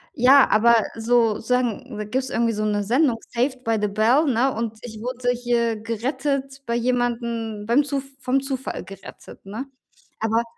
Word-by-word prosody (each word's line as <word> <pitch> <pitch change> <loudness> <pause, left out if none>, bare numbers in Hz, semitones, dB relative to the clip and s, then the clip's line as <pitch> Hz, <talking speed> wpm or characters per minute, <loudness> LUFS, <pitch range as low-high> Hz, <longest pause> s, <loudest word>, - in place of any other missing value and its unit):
Ja, 270 +2 +6
aber 235 +2 +5 0.2
so 225 -1 +2
sagen, 250 0 -1
da 210 - -3
gibt's 260 +5 -2
irgendwie 230 -1 +1
so 215 0 -2
'ne 205 -1 0
Sendung 245 +2 +2
'Saved 255 +2 -1
by 225 -2 +1
the 210 - +2
Bell', 225 +9 +3
ne, 255 +1 +2
und 225 -1 -4
ich 220 -3 -9
wurde 245 +1 -3
hier 235 -2 0
gerettet 270 +4 -3
bei 235 0 -1
jemandem, 235 -3 -1
beim 240 +6 +3
Zu 280 -1 -2 0.2
vom 265 +1 +1
Zufall 270 -1 -4
gerettet, 195 0 -12
ne? 215 +7 -6 0.5
Aber 225 +1 +1
235 Hz, 165 wpm, -23 LUFS, 225-260 Hz, 0.5 s, Ja